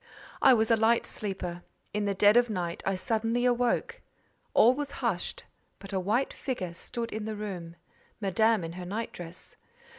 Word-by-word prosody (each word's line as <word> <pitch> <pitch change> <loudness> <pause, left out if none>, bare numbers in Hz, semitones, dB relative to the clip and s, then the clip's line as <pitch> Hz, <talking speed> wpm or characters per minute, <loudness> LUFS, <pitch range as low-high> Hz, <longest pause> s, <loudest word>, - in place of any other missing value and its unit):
I 260 - +7
was 220 0 +2
a - - +7
light 225 +1 +3
sleeper; 185 -4 -4 0.3
in 210 0 0
the 200 -1 0
dead 205 +2 +6
of 240 0 +5
night 175 -5 -3
I 195 - +2
suddenly 225 +4 0
awoke. 250 - +1 0.5
All 240 +3 +7
was 285 +1 -4
hushed, 225 -9 -2 0.3
but 195 0 -10
a 190 - +1
white 215 +8 0
figure 185 -10 -4
stood 230 +6 -4
in 215 0 -4
the 220 0 -3
room—Madame 200 +2 -2
in 165 0 -5
her 180 0 -7
night 220 +5 -3
dress. 175 0 -9
215 Hz, 170 wpm, -29 LUFS, 185-235 Hz, 0.5 s, I